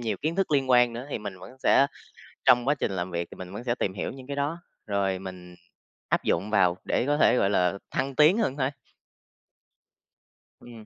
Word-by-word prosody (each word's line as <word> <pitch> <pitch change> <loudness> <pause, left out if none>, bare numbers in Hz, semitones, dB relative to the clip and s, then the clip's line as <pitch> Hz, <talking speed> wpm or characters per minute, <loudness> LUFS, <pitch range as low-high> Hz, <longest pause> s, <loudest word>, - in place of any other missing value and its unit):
nhiều 110 -4 -2
kiến 160 +4 -3
thức 195 - 0
liên 135 -3 +1
quan 125 -1 +5
nữa 120 +4 -6
thì - - -2
mình 100 -3 -7
vẫn 95 +1 -11
sẽ 140 - +5 0.6
trong 125 +1 +5
quá 145 - +3
trình 120 - -2
làm 90 -1 -3
việc 85 0 -3
thì - - -10
mình 95 +1 -9
vẫn 110 - -6
sẽ 120 -1 0
tìm 95 -6 -2
hiểu 95 - -4
những 130 0 -11
cái 140 - -4
đó, 145 +4 -1 0.3
rồi 100 -2 0
mình 90 -2 -9 0.5
áp - - +1
dụng 95 +5 0
vào 90 -4 +3
để - - 0
có 145 +1 +1
thể, 125 - +4
gọi 100 - +2
là, 90 -2 +2 0.2
thăng 135 0 -2
tiến 155 +8 +5
hơn 170 - 0
thôi. 130 -2 +1 1.9
Ừm. 115 -3 -13
120 Hz, 215 wpm, -26 LUFS, 95-135 Hz, 1.9 s, quan